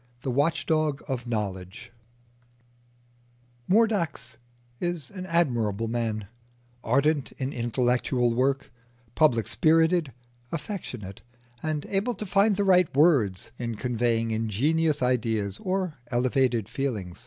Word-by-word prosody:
THE 130 - -1
WATCH 145 +6 +1
DOG 155 -3 0
OF 125 -2 -3
KNOWLEDGE 95 -5 -4 1.8
Mordax 180 - +1 0.4
is 175 -6 -3
an 185 -2 -7
admirable 120 - +1
man, 110 -2 -2 0.6
ardent 140 +4 +1
in 130 +1 -4
intellectual 120 0 +1
work, 135 +3 0 0.4
public 120 -8 +3
spirited, 160 - +3 0.4
affectionate, 130 - -6 0.4
and 155 -2 -2
able 205 +5 -1
to 215 - -6
find 200 +2 +3
the 200 - +1
right 185 -3 +4
words 115 - +3
in 120 -2 -3
conveying 115 -1 0
ingenious 140 +8 +1
ideas 110 -5 0
or 185 -6 -2
elevated 125 -3 +1
feeling. 115 -8 -3
130 Hz, 110 wpm, -26 LUFS, 115-160 Hz, 1.8 s, right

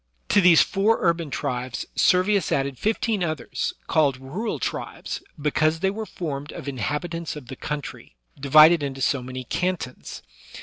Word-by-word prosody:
To 205 - +5
these 175 -3 +7
four 210 +3 +2
urban 170 -3 +1
tribes 125 -1 -3
Servius 190 +2 +3
added 135 -2 -1
fifteen 215 -2 0
others, 155 -5 -3
called 145 -4 +2
rural 175 - -4
tribes, - - -4 0.2
because 155 +2 +1
they 190 0 +2
were 215 +1 -5
formed 145 -4 -5
of - - -9
inhabit 150 +6 -3
ants 165 -2 -4
of 135 -5 -10
the 130 - -6
country, 150 - -6 0.2
divided 155 +4 +7
into 135 -1 -4
so 140 +1 +1
many 130 +1 -6
cantons. 175 -2 -4
155 Hz, 150 wpm, -24 LUFS, 135-180 Hz, 0.2 s, these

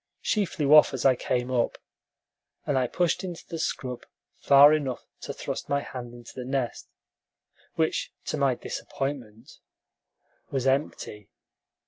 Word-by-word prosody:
She 210 -2 +2
flew 150 -4 +1
off 150 -3 +7
as 130 - -4
I 130 -1 +6
came 125 +1 -1
up, 120 -2 +1 0.9
and 145 - 0
I 130 -1 +2
pushed 175 +7 0
into 175 -3 -6
the 165 - -5
scrub 125 -5 -3 0.4
far 145 +2 +8
enough 140 -5 -2
to - - -6
thrust - - -5
my 140 0 +1
hand 125 -3 -7
into 120 -1 -12
the 125 - -6
nest, 130 -1 -3 0.9
which, 160 -1 0
to - - -2
my 140 -4 +2
disappointment, 120 -5 -6 0.9
was 135 -2 -2
empty. 130 -6 -1
135 Hz, 140 wpm, -27 LUFS, 125-145 Hz, 0.9 s, far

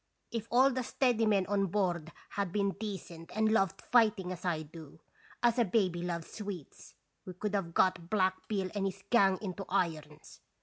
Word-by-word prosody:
If 230 -1 -3
all 260 +3 +5
the 255 0 -1
steady 245 -3 +1
men 200 -3 +3
on 200 0 +1
board 175 -4 -1 0.2
had 200 -3 -2
been 200 0 +1
decent 190 -6 -7
and 220 0 +3
loved 195 -3 +1
fighting 215 -6 +3
as 180 -1 -7
I 165 -4 -1
do, 160 0 -12 0.4
as 240 0 +4
a - - +6
baby 185 -4 +1
loves 170 -2 -4
sweets, 200 -9 -8 0.3
we 185 - -8
could 210 +3 -3
have 175 -5 -2
got 180 -2 +2
Black 185 -2 +1
Bill 195 -3 -1
and 200 -2 -1
his 195 0 -6
gang 195 -5 +5
into 195 0 -4
irons. 155 -5 -2
195 Hz, 180 wpm, -32 LUFS, 175-215 Hz, 0.4 s, a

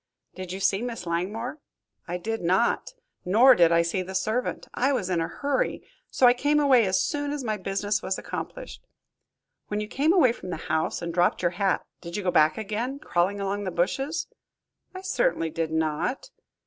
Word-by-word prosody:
"Did 185 -1 -7
you 190 - -5
see 195 +1 +1
Miss 235 -5 -5
Langmore?" 205 - -3 0.5
"I 175 +1 -2
did 225 +5 -3
not, 190 - +1 0.3
nor 230 +8 +6
did 170 -7 +4
I 170 0 +4
see 170 +3 -1
the 190 +1 -7
servant. 215 +6 -1
I 265 +3 +1
was 190 -9 -1
in 170 -2 +1
a 165 - -1
hurry, 285 -1 -1
and - - -16 0.3
so 255 - +3
I 245 - +8
came 290 +4 +2
away 260 -7 +5
as 190 0 +2
soon 290 +6 -1
as 290 -2 -3
my 215 -3 -1
business 205 +2 -1
was 190 - -2
accomplished." - - -7 0.9
"When 210 - -2
you 210 - -3
came 285 +8 +1
away 330 -10 +5
from 210 -6 -8
the 170 - -3
house 160 +2 -2
and 170 0 -3
dropped 175 +1 +2
your 175 - +2
hat, 195 +1 0 0.2
did 170 +2 -6
you 205 - -3
go 180 - +1
back 155 -2 +4
again, 220 +5 -3
crawling 195 -5 0
along 200 +1 -2
by 205 - -5
the 175 - -10
bushes?" 270 - -1 0.7
"I 375 - -6
certainly 380 - 0
did 165 0 -2
not." 160 - -2
200 Hz, 200 wpm, -26 LUFS, 175-250 Hz, 0.9 s, I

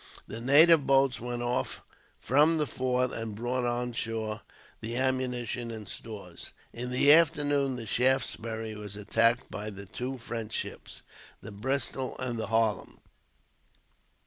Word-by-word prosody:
The 115 +2 -6
native 150 +4 +6
boats 135 -2 +3
went 120 0 -4
off 120 +1 -2 0.4
from 150 +5 +3
the 150 - +1
fort, 125 -2 0
and 115 -2 -5
brought 120 +3 -2
on 120 0 -1
shore 115 -1 -3 0.4
the 115 +2 -4
ammunition 125 -2 -1
and 110 -3 -7
stores. 100 -6 -9 0.2
In 125 +1 -4
the 130 +3 +6
afternoon 145 -4 +3
the 120 -2 -6
Shaftesbury 115 -2 0
was 105 -1 -8
attacked 115 +3 +1
by 105 +2 -4
the 100 -1 -9
two 125 +7 -5
French 115 -2 -6
ships, - - -6 0.4
the 110 - -9
Bristol 130 +4 -2
and 120 -3 -3
the 110 - -3
Harlem. 110 -1 0
120 Hz, 140 wpm, -29 LUFS, 110-130 Hz, 0.4 s, native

